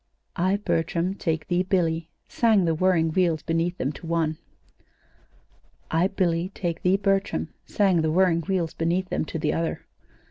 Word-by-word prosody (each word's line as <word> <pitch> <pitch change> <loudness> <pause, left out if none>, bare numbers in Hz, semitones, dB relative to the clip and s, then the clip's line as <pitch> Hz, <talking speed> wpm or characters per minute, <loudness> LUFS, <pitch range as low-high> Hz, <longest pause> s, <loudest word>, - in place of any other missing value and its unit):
"'I, 185 +2 +1
Bertram, 170 +2 0
take 160 -5 -2
thee, 175 0 +1
Billy,'" 170 -3 0 0.2
sang 220 -6 +3
the 165 - +2
whirring 165 -1 +2
wheels 165 -3 +1
beneath 165 +2 -1
them, 135 - -1
to 165 - -10
one. 160 -2 0 1.5
"'I, 165 +3 +3
Billy, 180 -3 0
take 170 -3 -3
thee, 185 +2 +3
Bertram,'" 195 0 0 0.2
sang 190 -6 +2
the 160 - +1
whirring 170 0 +3
wheels 175 -2 -1
beneath 175 +3 -1
them, - - -1
to 160 - -5
the 150 -1 0
other. 165 0 -2
170 Hz, 155 wpm, -25 LUFS, 165-185 Hz, 1.5 s, sang